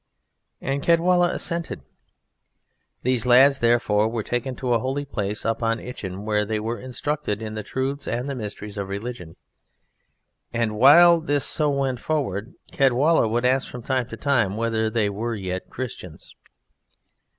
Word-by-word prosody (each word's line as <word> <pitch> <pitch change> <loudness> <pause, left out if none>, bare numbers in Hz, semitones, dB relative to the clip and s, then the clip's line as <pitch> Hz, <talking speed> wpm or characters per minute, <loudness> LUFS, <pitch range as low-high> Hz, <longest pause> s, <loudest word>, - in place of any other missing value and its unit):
And 135 +1 -2
Caedwalla 175 +2 +3
assented. 170 - -4 1.2
These 125 -1 +1
lads, 135 +3 +6
therefore, 115 -3 +2
were 115 -1 -3
taken 120 +3 -3
to 125 0 -1
a 115 - +3
holy 135 +4 -2
place 105 -6 -3
up 115 +1 -1
on 115 0 0
Itchen, 100 -5 -7
where 105 -1 +1
they 110 +1 -2
were 115 +2 -3
instructed 130 -2 -3
in 110 -1 -6
the 110 - -4
truths 135 +5 -3
and 120 +3 -2
the 140 - -3
mysteries 105 -3 -7
of 100 -1 -4
religion. 100 -5 -6 1.2
And 115 -2 -1
while 170 +9 +7
this 145 -3 0
so 150 -2 +1
went 135 -3 -1
forward 120 -8 -2 0.2
Caedwalla 135 +1 +3
would 120 +3 0
ask 130 +1 +2
from 125 -1 -8
time 130 -2 -1
to 115 - -8
time 120 -8 +1
whether 110 -1 0
they 110 -2 +1
were 115 +4 -3
yet 95 -2 -5
Christians. 105 -10 -8
120 Hz, 155 wpm, -23 LUFS, 110-135 Hz, 1.2 s, while